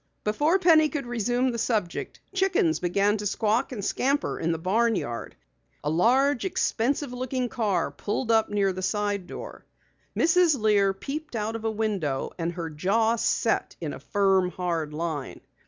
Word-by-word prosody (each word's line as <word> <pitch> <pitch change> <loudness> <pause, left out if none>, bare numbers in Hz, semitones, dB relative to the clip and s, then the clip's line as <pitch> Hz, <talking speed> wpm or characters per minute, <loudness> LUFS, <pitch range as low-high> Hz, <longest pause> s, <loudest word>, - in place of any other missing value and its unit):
Before 295 - +2
Penny 320 -5 +5
could 290 -4 -4
resume 245 +2 0
the 235 - -4
subject, 210 -7 -2
chickens 380 -3 +2
began 200 +4 +1
to 210 0 -2
squawk 220 +5 0
and 205 -6 -4
scatter 280 +3 0
in 165 - 0
the 165 - -1
barn 220 +7 +1
yard. 120 -9 -4 0.5
A 150 - 0
large, 250 - +3
expensive 280 -6 0
looking 255 0 -2
car 205 -8 0
pulled 225 +3 -2
up 220 -1 +3
near 200 -2 +1
the 185 - -5
side 205 -1 -1
door. - - -8 0.5
Mrs. 335 -4 +4
Lear 205 -2 +3
peeped 290 +7 -6
out 220 +1 -2
of 225 0 -5
a - - +2
window 200 -11 -2
and 170 +1 -1
her 165 -2 -5
jaw 220 +9 +1
set 230 - 0
in - - -4
a - - -8
firm, 195 -3 +2
hard 170 -4 -2
line. 155 -3 -4
220 Hz, 165 wpm, -26 LUFS, 185-255 Hz, 0.5 s, Penny